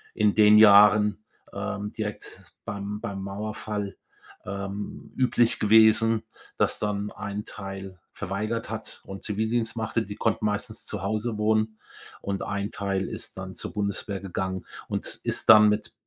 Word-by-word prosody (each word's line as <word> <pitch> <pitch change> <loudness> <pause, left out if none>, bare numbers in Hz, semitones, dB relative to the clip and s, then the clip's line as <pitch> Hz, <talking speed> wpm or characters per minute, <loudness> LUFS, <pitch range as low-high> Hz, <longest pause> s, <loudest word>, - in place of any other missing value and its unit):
in 105 -1 +3
den 105 0 +7
Jahren, 105 0 +7 0.3
ähm, 100 +1 -4
direkt 105 -2 -7
beim 105 -1 -4
beim 100 -1 -4
Mauerfall, 105 0 -4 0.5
ähm, 100 +1 -6
üblich 120 -2 +2
gewesen, 110 +1 +5 0.3
dass - - +1
dann 105 0 -2
ein 105 +1 -5
Teil 95 -2 -8 0.2
verweigert 105 +4 -3
hat 110 0 -6
und 95 0 -8
Zivildienst 110 +2 -1
machte. 115 0 -1
Die 105 -1 -7
konnten 110 0 0
meistens 105 -1 -2
zu - - -3
Hause 110 +3 -2
wohnen 110 0 +1 0.4
und 100 -1 -3
ein 100 +1 -2
Teil 95 -1 -2
ist - - -7
dann 95 0 -7
zur - - -7
Bundeswehr 100 -1 -2
gegangen 95 -1 -4 0.2
und - - -5
ist - - -2
dann 105 0 +10
mit 105 +1 -1
105 Hz, 140 wpm, -26 LUFS, 100-110 Hz, 0.5 s, dann